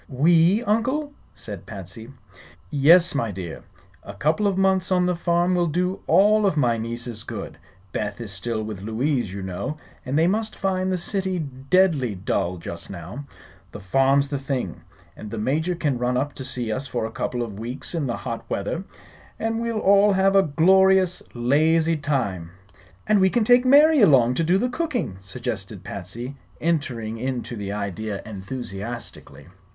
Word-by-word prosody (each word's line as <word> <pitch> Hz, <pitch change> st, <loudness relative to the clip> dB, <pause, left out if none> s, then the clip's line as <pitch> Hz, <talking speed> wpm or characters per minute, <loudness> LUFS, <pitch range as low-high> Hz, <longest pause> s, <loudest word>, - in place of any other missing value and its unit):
"We, 165 Hz, -, +4 dB
Uncle?" 260 Hz, +7 st, 0 dB, 0.2 s
said 100 Hz, -5 st, -8 dB
Patsy. 105 Hz, +3 st, -8 dB, 0.6 s
"Yes, 165 Hz, +5 st, +5 dB
my 115 Hz, -5 st, -1 dB
dear. 90 Hz, -4 st, -6 dB, 0.4 s
A -, -, -10 dB
couple 165 Hz, +8 st, +1 dB
of 195 Hz, -2 st, 0 dB
months 190 Hz, -1 st, +2 dB
on 180 Hz, -1 st, +3 dB
the 180 Hz, 0 st, +1 dB
farm 175 Hz, +1 st, +1 dB
will 175 Hz, -1 st, +2 dB
do 180 Hz, +4 st, -1 dB
all 205 Hz, +5 st, +5 dB
of 165 Hz, -, 0 dB
my 120 Hz, -5 st, +2 dB
nieces 115 Hz, 0 st, -5 dB
good. -, -, -7 dB, 0.3 s
Beth 105 Hz, 0 st, -3 dB
is 115 Hz, -3 st, -6 dB
still 110 Hz, +3 st, -3 dB
with 105 Hz, -3 st, -6 dB
Louise, 120 Hz, +1 st, -1 dB
you 100 Hz, 0 st, -6 dB
know, 95 Hz, +11 st, -4 dB, 0.3 s
and 135 Hz, +2 st, -2 dB
they 160 Hz, -, +4 dB
must 215 Hz, +4 st, 0 dB
find 190 Hz, -1 st, -1 dB
the 185 Hz, -, +1 dB
city 190 Hz, +1 st, 0 dB
deadly 140 Hz, -, +1 dB
dull, 90 Hz, -1 st, -1 dB
just 85 Hz, 0 st, -7 dB
now. 100 Hz, -, -8 dB, 0.5 s
The -, -, -7 dB
farm's 135 Hz, +7 st, +2 dB
the 140 Hz, -1 st, -2 dB
thing. 130 Hz, -, -3 dB, 0.3 s
And 105 Hz, -, -9 dB
the 115 Hz, -, -6 dB
Major 155 Hz, +11 st, 0 dB
can 145 Hz, -7 st, -1 dB
run 125 Hz, 0 st, 0 dB
up 145 Hz, +3 st, -1 dB
to 130 Hz, -, -7 dB
see 125 Hz, -3 st, -3 dB
us 130 Hz, +5 st, -3 dB
for 120 Hz, -4 st, -2 dB
a 110 Hz, -, -5 dB
couple 120 Hz, +1 st, -2 dB
of 105 Hz, -3 st, -7 dB
weeks 120 Hz, +8 st, -5 dB
in 160 Hz, -5 st, -1 dB
the 120 Hz, -, -2 dB
hot 115 Hz, -, -5 dB
weather, 130 Hz, -, -2 dB, 0.5 s
and 225 Hz, +1 st, -2 dB
we'll 230 Hz, -1 st, -2 dB
all 200 Hz, 0 st, +5 dB
have 195 Hz, +1 st, +3 dB
a 195 Hz, -, +7 dB
glorious, 190 Hz, +3 st, +4 dB
lazy 155 Hz, +7 st, +3 dB
time." 130 Hz, -, -2 dB, 0.6 s
"And 215 Hz, -1 st, +3 dB
we 190 Hz, -, +5 dB
can 240 Hz, +3 st, +1 dB
take 245 Hz, +3 st, +5 dB
Mary 290 Hz, +2 st, +6 dB
along 130 Hz, -, +5 dB
to 165 Hz, -, 0 dB
do 175 Hz, +4 st, +3 dB
the 245 Hz, -, +1 dB
cooking," 250 Hz, -, -2 dB
suggested 95 Hz, 0 st, -5 dB
Patsy, 120 Hz, +9 st, -7 dB, 0.2 s
entering 125 Hz, -9 st, -2 dB
into 125 Hz, -1 st, -3 dB
the 100 Hz, -2 st, -5 dB
idea 105 Hz, 0 st, -4 dB
enthusiastically. 110 Hz, +2 st, -7 dB
140 Hz, 170 wpm, -23 LUFS, 115-185 Hz, 0.6 s, a